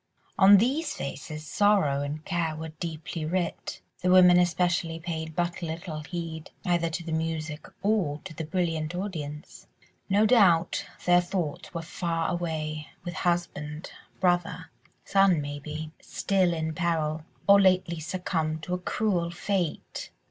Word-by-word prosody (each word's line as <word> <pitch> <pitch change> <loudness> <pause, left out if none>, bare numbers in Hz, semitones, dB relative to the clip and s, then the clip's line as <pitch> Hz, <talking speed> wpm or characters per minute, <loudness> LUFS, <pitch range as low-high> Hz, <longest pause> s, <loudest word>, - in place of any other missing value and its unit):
On 200 +1 +9
these 280 +9 +1
faces 150 +3 -6
sorrow 190 -7 +3
and 150 +2 -4
care 165 -2 -1
were 160 +1 -6
deeply 165 0 -4
writ; 170 +2 -2 0.2
the 180 - +1
women 180 -1 +8
especially 175 -2 +1
paid 160 -2 -5
but 175 +1 -1
little 165 -1 -4
heed, 160 0 -6 0.2
either 170 -2 +2
to 160 +1 -4
the 165 - -4
music 160 -1 -3 0.2
or 195 -9 +1
to - - -8
the 160 - -5
brilliant 165 -1 -1
audience; 155 -6 -6 0.4
no 205 +3 +4
doubt 190 -8 +4 0.2
their 175 0 +6
thoughts 175 -4 -3
were 165 - -3
far 165 0 -2
away 155 -3 -3 0.2
with 175 - -4
husband, 160 -3 -2 0.3
brother, 175 -1 0 0.3
son 195 -4 +4
maybe, 150 +2 -5
still 190 -3 +1
in 160 -1 -2
peril, 160 -2 0 0.2
or 200 0 +7
lately 185 -3 +3
succumbed 160 -2 -2
to 180 - -3
a 180 - 0
cruel 180 -2 0
fate. 175 -1 -3
170 Hz, 140 wpm, -27 LUFS, 155-180 Hz, 0.4 s, On